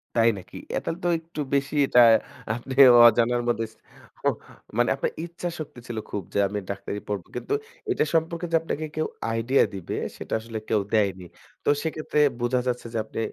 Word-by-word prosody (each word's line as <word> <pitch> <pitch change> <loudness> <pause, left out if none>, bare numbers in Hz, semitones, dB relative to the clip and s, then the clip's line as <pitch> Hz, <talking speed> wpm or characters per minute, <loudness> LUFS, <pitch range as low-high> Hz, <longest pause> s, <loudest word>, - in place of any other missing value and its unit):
তাই 115 0 +5
নাকি? 90 - -10
অ্যা - - 0
তাইলে 165 - -3
তো - - +3
একটু 165 -1 -7
বেশি 140 +2 0
এটা 125 - +5 0.5
আপনি 120 +3 -6 0.3
অজানার 120 +1 +3
মধ্যে 115 -1 +1 1.1
মানে 120 - +3
আপনার 135 - -1
ইচ্ছা 175 +1 -6
শক্তি 145 -5 -7
ছিল 120 - -5
খুব 100 - -3
যে - - -1
আমি 105 +1 -3
ডাক্তারি 100 +1 -4
পড়ব। 100 -3 -3
কিন্তু 425 - -3 0.4
এটা - - +2
সম্পর্কে 165 +1 0
যে 165 - +3
আপনাকে 155 -1 -3
কেউ 155 0 0 0.3
আইডিয়া 120 +4 +3
দিবে 95 -3 -5 0.2
সেটা - - -6
আসলে 115 0 -7
কেউ 105 -2 +3
দেয়নি। 95 -4 +1 0.4
তো - - +1
সেক্ষেত্রে 155 -1 -1 0.2
বোঝা 125 +1 +1
যাচ্ছে 125 -1 -2
যে - - -1
আপনি - - -6
120 Hz, 175 wpm, -25 LUFS, 110-155 Hz, 1.1 s, তাই